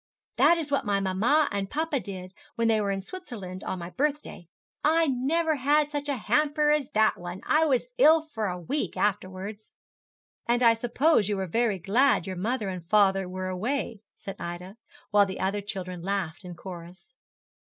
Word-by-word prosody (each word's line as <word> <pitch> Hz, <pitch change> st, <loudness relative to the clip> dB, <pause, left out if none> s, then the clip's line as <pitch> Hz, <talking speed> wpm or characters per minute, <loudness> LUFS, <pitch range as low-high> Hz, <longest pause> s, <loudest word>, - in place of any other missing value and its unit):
'That 340 Hz, -, +5 dB
is 305 Hz, -3 st, -4 dB
what 280 Hz, -, +1 dB
my 205 Hz, -2 st, +1 dB
mamma 215 Hz, +11 st, +2 dB
and 200 Hz, -1 st, -2 dB
papa 310 Hz, -1 st, -1 dB
did, 185 Hz, -4 st, -8 dB, 0.2 s
when 230 Hz, 0 st, +1 dB
they 220 Hz, -1 st, +3 dB
were 200 Hz, -, -1 dB
in 195 Hz, 0 st, -1 dB
Switzerland, 195 Hz, -, -8 dB
on -, -, -3 dB
my 170 Hz, 0 st, -7 dB
birthday. 280 Hz, -, -2 dB, 0.4 s
I 325 Hz, +2 st, +4 dB
never 305 Hz, +4 st, +1 dB
had 295 Hz, +3 st, +2 dB
such 290 Hz, 0 st, -3 dB
a 280 Hz, -, 0 dB
hamper 295 Hz, +6 st, +2 dB
as 300 Hz, -3 st, +1 dB
that 215 Hz, 0 st, +3 dB
one. 175 Hz, +1 st, -6 dB
I 315 Hz, +1 st, +3 dB
was 255 Hz, -4 st, +2 dB
ill 310 Hz, +4 st, +6 dB
for 225 Hz, -9 st, -4 dB
a 180 Hz, -1 st, -4 dB
week 275 Hz, -, -3 dB
afterwards.' 205 Hz, +1 st, -3 dB, 0.7 s
'And 240 Hz, +1 st, +2 dB
I 230 Hz, -1 st, +7 dB
suppose 240 Hz, -, +2 dB
you 205 Hz, -, 0 dB
were 190 Hz, -, -2 dB
very 220 Hz, +3 st, 0 dB
glad 215 Hz, +4 st, +2 dB
your 190 Hz, -, -5 dB
mother 215 Hz, +4 st, -2 dB
and 185 Hz, -2 st, -5 dB
father 195 Hz, -3 st, +3 dB
were 185 Hz, 0 st, -4 dB
away,' 220 Hz, +3 st, -3 dB
said 195 Hz, -1 st, -8 dB
Ida, 175 Hz, +3 st, -6 dB, 0.4 s
while 205 Hz, -1 st, +5 dB
the 190 Hz, -, -6 dB
other 200 Hz, +2 st, -1 dB
children 185 Hz, -3 st, -6 dB
laughed 190 Hz, -2 st, -3 dB
in 180 Hz, -1 st, -8 dB
chorus. 175 Hz, +3 st, -11 dB
210 Hz, 185 wpm, -27 LUFS, 185-280 Hz, 0.7 s, I